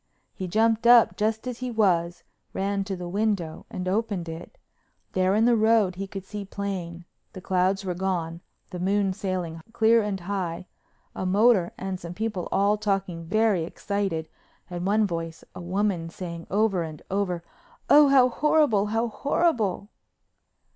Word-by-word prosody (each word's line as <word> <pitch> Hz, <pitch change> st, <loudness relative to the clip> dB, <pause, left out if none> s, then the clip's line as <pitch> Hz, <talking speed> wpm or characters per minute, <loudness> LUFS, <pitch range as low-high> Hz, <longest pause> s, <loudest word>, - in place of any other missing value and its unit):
He 185 Hz, -, -5 dB
jumped 225 Hz, +4 st, +2 dB
up 240 Hz, -1 st, +7 dB
just 220 Hz, +2 st, -1 dB
as 250 Hz, -2 st, -5 dB
he 255 Hz, 0 st, -3 dB
was, 175 Hz, -7 st, +1 dB, 0.3 s
ran 195 Hz, +1 st, -1 dB
to 195 Hz, -1 st, -3 dB
the 180 Hz, -1 st, -6 dB
window 195 Hz, -4 st, -2 dB
and 185 Hz, 0 st, -5 dB
opened 195 Hz, -3 st, -1 dB
it. 165 Hz, -, -8 dB, 0.5 s
There 185 Hz, +1 st, +2 dB
in 220 Hz, +2 st, +3 dB
the 240 Hz, 0 st, +5 dB
road 220 Hz, -3 st, +3 dB
he 195 Hz, +2 st, -5 dB
could 195 Hz, -1 st, -7 dB
see 210 Hz, +1 st, -6 dB
plain—the 185 Hz, -2 st, -7 dB
clouds 190 Hz, +2 st, +1 dB
were 180 Hz, -, -1 dB
gone, 175 Hz, -2 st, -2 dB, 0.3 s
the 180 Hz, -, -5 dB
moon 195 Hz, +1 st, +1 dB
sailing 180 Hz, -4 st, -4 dB
clear 230 Hz, 0 st, +4 dB
and 205 Hz, -3 st, -3 dB
high—a 185 Hz, 0 st, -6 dB
motor 200 Hz, -2 st, +4 dB
and 190 Hz, -1 st, -4 dB
some 170 Hz, 0 st, -8 dB
people 210 Hz, -4 st, -3 dB
all 205 Hz, +2 st, +2 dB
talking 195 Hz, -5 st, -2 dB
very 210 Hz, -1 st, +2 dB
excited, 185 Hz, -2 st, -3 dB, 0.4 s
and 175 Hz, +1 st, -3 dB
one 215 Hz, +2 st, +3 dB
voice, 165 Hz, -3 st, -5 dB
a -, -, -8 dB
woman's, 180 Hz, -2 st, -1 dB
saying 170 Hz, -2 st, -7 dB
over 200 Hz, -2 st, +1 dB
and 155 Hz, -2 st, -7 dB
over, 185 Hz, -3 st, -1 dB, 0.4 s
"Oh, 295 Hz, 0 st, +7 dB
how 270 Hz, -2 st, +6 dB
horrible—how 230 Hz, -6 st, +2 dB
horrible!" 230 Hz, -, 0 dB
195 Hz, 150 wpm, -26 LUFS, 175-215 Hz, 0.5 s, up